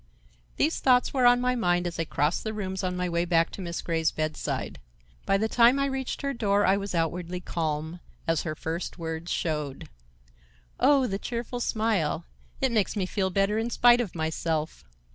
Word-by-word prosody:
These 315 +3 +1
thoughts 250 -1 +3
were 255 -3 +4
on 245 0 +6
my 250 0 +1
mind 175 -6 +1
as 170 -1 -4
I 165 - 0
crossed 150 +2 0
the 220 -1 -4
rooms 190 -2 -3
on 180 -1 -1
my 180 0 -1
way 170 0 0
back 170 -1 +2
to - - -7
Miss 170 -2 -4
Grey's 160 -1 +1
bedside. 155 - -3 0.5
By 195 - +4
the 220 +2 0
time 240 +3 +5
I 275 - +1
reached 265 0 -3
her 280 0 -1
door 205 -4 +2
I 195 - +4
was 200 -2 -3
outwardly 175 +2 -1
calm, 160 -1 -3 0.3
as 165 -1 +2
her 155 -1 -4
first 165 +4 -4
words 165 0 -5
showed: 150 -4 -3 0.9
"Oh, 275 -2 +5
the 195 -4 -2
cheerful 240 +1 -4
smile! 215 -9 0 0.4
It 265 -2 +2
makes 215 -3 +1
me 195 -3 0
feel 190 0 -1
better 195 +3 +1
in 230 +1 -1
spite 240 0 +5
of 205 -8 -5
myself." 160 -1 -2
185 Hz, 190 wpm, -27 LUFS, 165-235 Hz, 0.9 s, on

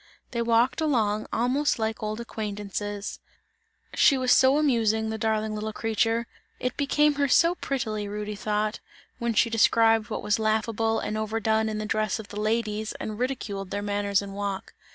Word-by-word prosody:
They 235 - -1
walked 235 +5 +2
along 220 -8 +1
almost 260 +5 +1
like 220 -1 -2
old 215 +1 -3
acquaintances; 205 -2 -5 0.7
she 275 - +5
was 255 -1 +1
so 265 +3 +6
amusing, 220 -6 +2
the 220 - -4
darling 220 -1 0
little 215 +1 -3
creature, 225 +1 0 0.3
it 250 0 -2
became 295 +1 +3
her 280 - +3
so 335 +6 +4
prettily 220 - -3
Rudy 210 +1 -4
thought, 210 +1 -1 0.4
when 235 -1 -1
she 230 +2 +3
described 225 0 +4
what 220 - -4
was 210 +1 +1
laughable 220 +1 +1
and 215 - -3
overdone 220 0 0
in 215 - -3
the 215 - -3
dress 215 -1 0
of 215 -2 -9
the 205 - -6
ladies, 215 0 -1
and 215 0 -6
ridiculed 210 -7 -3
their 205 +1 -3
manners 205 -1 0
and 195 -1 -8
walk. 200 -1 -4
220 Hz, 170 wpm, -26 LUFS, 210-235 Hz, 0.7 s, so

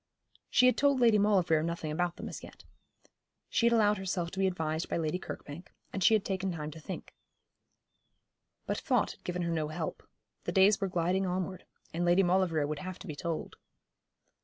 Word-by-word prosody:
She 250 - +5
had 255 - +5
told 280 -1 +3
Lady 230 -3 +5
Maulevrier 185 -6 +3
nothing 165 -1 -3
about 175 +2 -1
them - - -7
as - - -7
yet. - - -13 0.9
She 235 - +3
had 235 - +4
allowed 210 -3 +3
herself 180 -3 -2
to 195 - -6
be 195 - +3
advised 160 -3 -2
by - - 0
Lady 165 +2 -1
Kirkbank, 155 -1 -8 0.2
and 195 - -1
she 220 - +6
had 210 - 0
taken 190 -1 -1
time 155 -3 -5
to 160 - -10
think. 155 - -7 1.5
But - - -2
thought - - +1
had - - -16
given 180 0 -2
her 170 - -1
no 160 -2 0
help. 155 +1 -4 0.4
The - - -1
days 195 +2 +5
were 195 - +1
gliding 180 +2 0
onward, 185 0 -3 0.3
and 170 +2 -1
Lady 175 +2 +4
Maulevrier 175 -4 +2
would 150 0 -3
have 185 0 -6
to - - -11
be 155 -6 -6
told. 165 +1 -4
180 Hz, 195 wpm, -31 LUFS, 165-195 Hz, 1.5 s, she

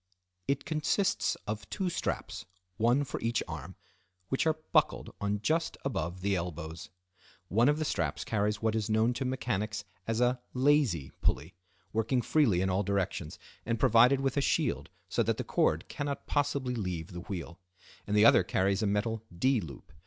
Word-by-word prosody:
It 140 0 0
consists 165 +5 +1
of 105 -1 -5
two 190 -2 -2
straps, - - -3 0.3
one 120 +6 +3
for 135 - -5
each 115 +1 0
arm, 80 +2 -7 0.5
which 135 +4 +1
are 155 -1 +2
buckled - - +2
on 100 0 -1
just 165 +7 0
above 90 - -2
the 100 0 +1
elbows. 85 -2 -5 0.6
One 115 +7 +4
of 150 - +2
the 155 - -1
straps 85 - -1
carries 105 0 -1
what 110 -1 +2
is 110 -1 -1
known 110 +3 +3
to 130 - -3
mechanics 110 -5 -2 0.2
as 115 0 0
a"lazy" 125 - +2
pulley, 80 +4 0 0.4
working 115 +3 +1
freely 115 - +3
in 95 - +1
all 95 +2 +2
directions, 95 -5 -2 0.3
and 115 -1 -1
provided 125 +3 +5
with 135 0 0
a - - +4
shield, - - 0 0.2
so - - 0
that - - +1
the - - -2
cord - - +1
cannot 140 -1 -4
possibly 140 -3 0
leave 90 -7 -3
the 90 - -6
wheel; 85 -2 -6 0.5
and 105 +1 +1
the 105 - +7
other - - +8
carries 95 +2 +1
a 110 - +1
metal 105 +2 0 0.2
"D" 130 +3 +3
loop. 75 -6 -10
110 Hz, 170 wpm, -30 LUFS, 95-130 Hz, 0.6 s, other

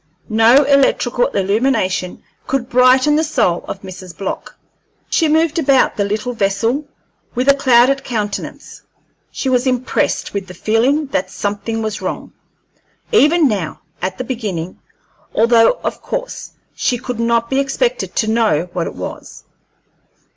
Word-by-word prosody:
No 230 +5 +5
electrical 270 -3 +2
illumination 200 -2 0 0.2
could 265 -2 -2
brighten 255 +4 +4
the 315 - +2
soul 235 - 0
of 195 - -6
Mrs. 185 -2 -10
Block. 195 - -5 0.5
She 325 - +3
moved 320 +1 +2
about 275 -4 +3
the 205 - 0
little 215 +5 -2
vessel 225 +7 0 0.5
with 250 +3 -1
a 280 - +8
clouded 265 0 +3
countenance. 210 -4 -5 0.5
She - - -4
was 255 0 +2
impressed 255 0 -1
with 200 -2 -3
the 180 - -10
feeling 245 - +1
that 185 0 0
something 205 +3 -3
was 215 -1 -4
wrong, - - -5 0.8
even 335 - +4
now 195 -9 -3 0.2
at 185 +1 -3
the - - -3
beginning, 205 -9 -4 0.6
although 230 - +5
of - - -3
course - - -5 0.2
she 245 - 0
could 250 -1 -6
not 230 0 +1
be 265 +2 0
expected 480 - -1
to 220 - +1
know 215 -7 +1
what 170 -2 -2
it - - -7
was. - - -8
235 Hz, 140 wpm, -17 LUFS, 205-270 Hz, 0.8 s, a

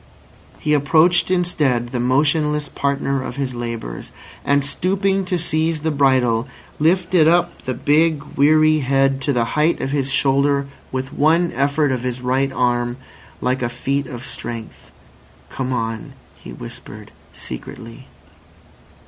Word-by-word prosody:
He 150 - 0
approached 155 +5 +4
instead 150 -10 +1
the 125 - -3
motionless 150 +3 +1
partner 140 -1 -1
of 130 - -6
his 135 -2 -3
labours, 115 - -6 0.3
and 140 0 +2
stooping 195 +5 0
to 180 0 -1
seize 160 -2 0
the 160 +1 0
bridle, 130 -5 +2 0.3
lifted 170 0 +3
up 175 +1 +2
the 130 - -2
big, 150 +3 +2
weary 155 +2 +4
head 135 0 +1
to 140 - 0
the 120 -3 +1
height 155 +3 +2
of 135 - -3
his 140 -2 0
shoulder 140 +1 +2 0.3
with 130 +1 -4
one 165 +3 +3
effort 140 +2 +1
of 130 -2 -1
his 125 0 -3
right 130 +2 0
arm, 120 -1 0 0.4
like 130 +1 0
a 120 - 0
feat 135 +3 -2
of 125 0 -8
strength. 115 - -7 0.6
"Come 130 -1 -4
on," 115 -3 -3 0.2
he - - -12
whispered - - -9 0.2
secretly. 115 +3 -9
140 Hz, 140 wpm, -20 LUFS, 125-155 Hz, 0.6 s, approached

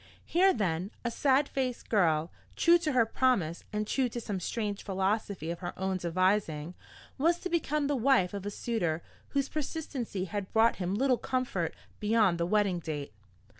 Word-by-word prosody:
Here 375 +3 +4
then, 185 - -1 0.2
a 235 - 0
sad 275 +3 +3
faced 255 -3 -3
girl, 165 -6 +2 0.2
true 345 0 +5
to 310 -3 -1
her 240 -3 +4
promise 220 -9 +1
and 210 0 -1
true 255 +3 +1
to 240 - -4
some 205 -4 -3
strange 205 +2 -3
philosophy 195 -3 -1
of 170 - -5
her 175 -1 -6
own 190 0 -1
devising, 175 -2 0 0.5
was 335 +4 +3
to 365 - -3
become 300 -3 +1
the 285 0 +1
wife 245 -7 +3
of 200 -2 -4
a 205 - -3
suitor 190 -7 -2 0.2
whose 275 -1 0
persistency 275 - -3
had 200 0 -4
brought 225 +1 +4
him 185 +1 -1
little 255 +2 +2
comfort 245 -10 -1 0.2
beyond 210 -5 +3
the 170 - +1
wedding 200 -3 +2
date. 145 -7 -5
210 Hz, 170 wpm, -30 LUFS, 180-260 Hz, 0.5 s, true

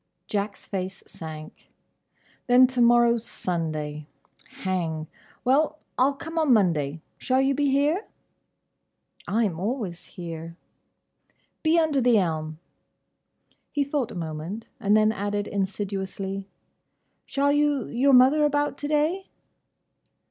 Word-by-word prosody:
Jack's 205 0 -3
face 190 -1 -5
sank. 155 -1 -10 0.8
"Then 250 +1 +7
to 255 -1 0
morrow 235 0 +5
's 225 - -6
Sunday. 155 -7 -3 0.6
Hang. 165 -4 -1 0.4
Well! 300 +4 +3 0.2
I'll 275 +2 +3
come 325 +4 -4
on 310 -4 +3
Monday. 165 - +2 0.2
Shall 260 0 +1
you 270 +1 +3
be 285 +1 +1
here?" 295 +9 +1 1.2
"I 225 +3 +2
am 175 -6 -1
always 195 -4 -3
here." 165 -1 -8 1.0
"Be 320 +1 +3
under 310 -4 +2
the 240 -2 +4
elm." 155 -4 -1 1.1
He 290 - +1
thought 280 -4 -1
a - - -9
moment, 165 +6 -5
and 205 +1 +3
then 215 0 +4
added 205 0 -2
insidiously, 195 0 -3 0.8
"Shall 285 +1 +1
you 290 -3 +2
your 270 +3 +2
mother 265 +4 +6
about 290 -1 +1
to 290 - -3
day?" 310 +6 0
220 Hz, 120 wpm, -25 LUFS, 180-280 Hz, 1.2 s, Then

